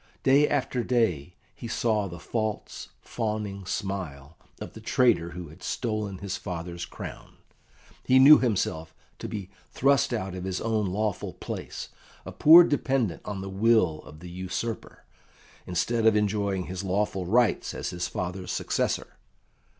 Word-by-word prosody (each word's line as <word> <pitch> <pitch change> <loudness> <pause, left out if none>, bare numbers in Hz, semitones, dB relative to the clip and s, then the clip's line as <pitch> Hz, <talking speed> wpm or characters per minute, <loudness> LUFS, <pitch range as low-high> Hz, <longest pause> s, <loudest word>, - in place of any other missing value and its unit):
Day 140 +3 +5
after 130 -3 0
day 90 - 0 0.2
he 115 - -8
saw 110 -3 0
the 85 -1 -8
false, 110 +4 -4
fawning 105 -4 -4
smile 85 -8 -4 0.2
of - - -8
the - - -11
traitor 115 -10 +2
who 85 -2 -7
had 80 +5 -15
stolen 110 -4 -3
his 95 0 -4
father's 85 -2 -5
crown. - - -9 0.7
He 130 - +4
knew 140 +3 +9
himself 80 -9 -1 0.2
to - - -5
be 100 -3 -6 0.2
thrust 140 0 +2
out 95 -6 -2
of 90 -1 -6
his 95 -1 -2
own 110 -2 0
lawful 105 +1 -2
place, - - -6 0.4
a - - -6
poor 165 +3 +9
dependent 130 - 0
on 100 -2 -4
the 95 - -6
will 100 -6 +3
of 75 +2 -14
the 90 - -9
usurper, 95 +5 -5 0.6
instead 115 +6 +1
of 110 - +5
enjoying 100 -2 0
his 95 +2 -5
lawful 95 -1 -1
rights 120 +3 +2
as - - -4
his 90 -1 -3
father's 90 0 -4
successor. - - -2
100 Hz, 150 wpm, -27 LUFS, 90-115 Hz, 0.7 s, knew